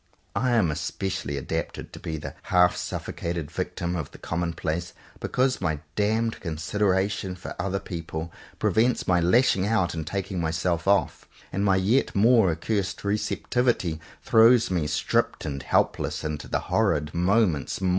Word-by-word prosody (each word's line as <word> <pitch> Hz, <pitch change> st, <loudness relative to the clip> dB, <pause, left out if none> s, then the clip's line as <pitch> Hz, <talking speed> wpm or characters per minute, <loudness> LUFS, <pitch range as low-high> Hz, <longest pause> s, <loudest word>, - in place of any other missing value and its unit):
I 120 Hz, +4 st, +1 dB
am 100 Hz, -9 st, +3 dB
especially 75 Hz, -2 st, -3 dB
adapted 70 Hz, -, -4 dB
to -, -, -8 dB
be 80 Hz, -, -4 dB
the 75 Hz, -, -7 dB, 0.2 s
half 90 Hz, -1 st, +5 dB
suffocated 85 Hz, -3 st, -4 dB
victim 85 Hz, +1 st, -3 dB
of 80 Hz, -5 st, -3 dB
the -, -, -13 dB
commonplace 85 Hz, 0 st, -3 dB, 0.3 s
because 130 Hz, -2 st, 0 dB
my 80 Hz, -5 st, 0 dB, 0.2 s
damned 110 Hz, +2 st, +1 dB
consideration 95 Hz, +3 st, -1 dB
for 90 Hz, -, -7 dB
other 100 Hz, +2 st, -1 dB
people 80 Hz, -3 st, -6 dB, 0.2 s
prevents 120 Hz, +3 st, +2 dB
my 90 Hz, -1 st, +4 dB
lashing 95 Hz, +1 st, +3 dB
out 95 Hz, -6 st, +1 dB
and 80 Hz, -2 st, -4 dB
taking 95 Hz, -1 st, -3 dB
myself 85 Hz, +2 st, -1 dB
off; 100 Hz, 0 st, +2 dB, 0.3 s
and 100 Hz, +3 st, 0 dB
my 100 Hz, -2 st, +4 dB
yet 105 Hz, +8 st, +2 dB
more 110 Hz, -1 st, +5 dB
accursed 95 Hz, +3 st, -2 dB
re 100 Hz, +1 st, +1 dB
ceptivity 110 Hz, -7 st, 0 dB, 0.2 s
throws 115 Hz, -1 st, +5 dB
me 85 Hz, -5 st, 0 dB
stripped 75 Hz, -, 0 dB
and 70 Hz, -1 st, -3 dB
helpless -, -, 0 dB
into 75 Hz, -1 st, -4 dB
the -, -, -1 dB
horrid 75 Hz, +1 st, +1 dB
moment's 90 Hz, -3 st, +1 dB
maw. 95 Hz, -1 st, 0 dB
90 Hz, 150 wpm, -26 LUFS, 80-105 Hz, 0.3 s, half